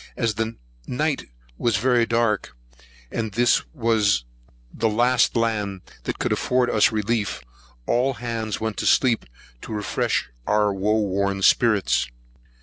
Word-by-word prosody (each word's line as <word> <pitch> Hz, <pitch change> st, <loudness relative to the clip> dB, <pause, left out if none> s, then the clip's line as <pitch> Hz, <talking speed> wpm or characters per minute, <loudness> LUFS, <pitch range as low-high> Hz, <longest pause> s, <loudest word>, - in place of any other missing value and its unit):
As 115 Hz, -3 st, +1 dB
the 110 Hz, +2 st, -3 dB, 0.3 s
night 150 Hz, +3 st, -1 dB, 0.3 s
was 120 Hz, -3 st, +1 dB
very 120 Hz, +1 st, +2 dB
dark, 115 Hz, -, 0 dB, 0.5 s
and 110 Hz, -3 st, -3 dB
this 120 Hz, +3 st, +3 dB
was 110 Hz, -, +1 dB, 0.5 s
the 115 Hz, 0 st, 0 dB
last 120 Hz, +4 st, +2 dB
land 105 Hz, -5 st, -1 dB, 0.2 s
that -, -, -3 dB
could -, -, -1 dB
afford 125 Hz, -1 st, +1 dB
us 110 Hz, -, +4 dB
relief, 110 Hz, -1 st, -1 dB, 0.5 s
all 130 Hz, +2 st, +1 dB
hands 115 Hz, -3 st, -3 dB
went 110 Hz, -1 st, -3 dB
to -, -, -1 dB
sleep, 120 Hz, -4 st, +3 dB, 0.4 s
to -, -, -9 dB
refresh 105 Hz, -, -1 dB, 0.2 s
our 105 Hz, -1 st, +2 dB
woe 105 Hz, +3 st, +1 dB
worn 100 Hz, 0 st, -1 dB
spirits. 100 Hz, -, +3 dB
110 Hz, 135 wpm, -23 LUFS, 105-120 Hz, 0.5 s, us